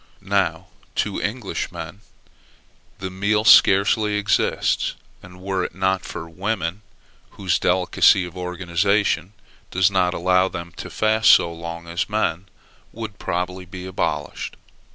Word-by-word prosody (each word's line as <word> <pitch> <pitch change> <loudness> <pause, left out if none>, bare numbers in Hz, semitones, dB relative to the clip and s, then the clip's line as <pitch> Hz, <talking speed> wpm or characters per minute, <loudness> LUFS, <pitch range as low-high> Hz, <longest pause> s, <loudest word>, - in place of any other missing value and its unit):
Now - - 0 0.3
to - - -1
English_men_ 100 - -4 1.0
that 95 -1 -5
meal 105 +3 +1
scarcely 105 0 +5
exists; 105 0 +1 0.3
and 90 0 -14
were 95 -1 -1
it 85 - -5
not 95 0 +1
for 85 - -7
women, 95 +1 -3 0.6
whose 95 -4 0
delicacy 90 0 +3
of 90 - -10
organization 90 +1 0 0.4
does 95 +1 +2
not 90 -2 +1
allow 90 +1 +3
them 85 -2 -7
to - - -7
fast 110 0 +2
so 85 - +6
long 85 0 -7
as 85 +3 -2
men, 100 -4 -1 0.4
would 110 -3 -7
probably 90 +1 -3
be 90 +1 -9
abolished. 95 - -3
95 Hz, 125 wpm, -22 LUFS, 90-100 Hz, 1.0 s, so